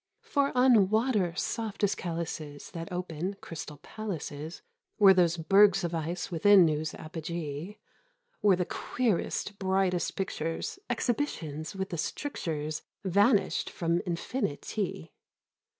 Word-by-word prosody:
For 280 -1 +1
on 240 -7 +6
water 215 -6 +2
soft 220 +1 -3
as 200 - +4
calices 165 -4 -5
That 165 0 -6
open, 180 +1 -3
Crystal 150 -2 -7
Palaces 165 -6 -6 0.3
Were 200 -3 +8
those 175 -2 +3
bergs 195 +3 +5
of 170 -1 -2
ice 170 +3 -3
within 180 +1 +6
whose 155 0 -1
apogee 160 +2 -5 0.7
Were 205 -3 +5
the 180 0 -1
queerest, 210 -3 -1
brightest 190 -2 +1
pictures 165 - -3
— - - -48
Exhibitions 160 - -2
with 190 0 -3
the 170 - -4
strictures 155 - -3 0.2
Vanished 200 +3 +3
from 170 0 0
Infinity. 180 - -3
180 Hz, 120 wpm, -29 LUFS, 160-205 Hz, 0.7 s, Were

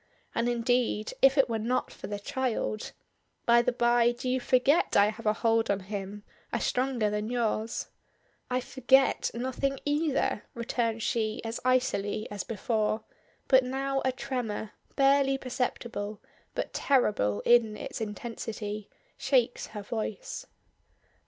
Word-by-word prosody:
And 235 +1 +1
indeed 240 -2 +1
if 270 +1 +6
it 275 - +5
were 225 -2 -1
not 250 +4 -1
for - - -8
the 205 - -3
child 220 0 -2 0.5
By 235 0 +6
the 245 - +1
bye, 240 0 +3
do 240 +2 -6
you 255 +1 +1
forget 255 +6 +3
I 200 +1 +6
have 220 +1 -7
a 210 - +4
hold 225 +1 +2
on 200 -1 +1
him 200 +1 -6 0.3
a - - 0
stronger 250 -4 0
than 210 +1 -2
yours?" 230 -2 -1 0.6
"I 250 0 0
forget 265 +1 +3
nothing 260 +2 -1
either," 290 -6 +1
returns 230 -1 -1
she 220 0 0
as 225 0 -4
icily 235 -5 +1
as 205 -2 -3
before; 220 0 -1 0.4
but 260 -1 +6
now 270 +1 -1
a 260 - +2
tremor, 240 -5 -4 0.2
barely 275 0 +4
perceptible, 240 -5 -3 0.4
but - - -3
terrible 205 - +2
in 230 -3 +4
its - - -6
intensity, 215 -1 -5 0.3
shakes 255 -3 +1
her 210 -1 -7
voice. - - -4
235 Hz, 140 wpm, -29 LUFS, 215-260 Hz, 0.6 s, if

